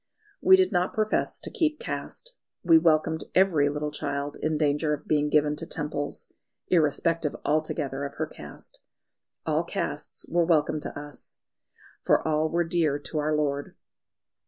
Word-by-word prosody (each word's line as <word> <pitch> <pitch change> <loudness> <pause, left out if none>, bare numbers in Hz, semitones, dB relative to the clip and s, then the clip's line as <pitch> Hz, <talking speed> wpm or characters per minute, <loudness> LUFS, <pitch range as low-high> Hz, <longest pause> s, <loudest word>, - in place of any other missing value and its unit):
We 380 - +8
did 375 -1 +3
not 180 +1 +1
profess 215 0 0
to - - -3
keep 310 -2 0
caste; - - -5 0.3
we 165 -2 +6
welcomed 160 -1 +2
every 170 -7 +4
little 150 +1 -3
child 145 -1 -3
in 155 0 0
danger 150 0 +1
of 150 - -16
being 150 -1 +2
given 150 0 +3
to - - -4
Temples, 150 -1 -4 0.4
irrespective 165 -1 +2
altogether 145 -2 0
of 140 - -5
her - - -1
caste. - - -10 0.6
All - - +1
castes - - -4
were 170 +1 +2
welcome 155 -2 +2
to 145 - -5
us, 145 -1 -10 0.6
for - - +2
all 155 0 +1
were 170 +1 +1
dear 165 -4 +1
to 150 +2 -4
our 155 +1 +1
Lord. 145 -1 -2
155 Hz, 155 wpm, -27 LUFS, 145-165 Hz, 0.6 s, We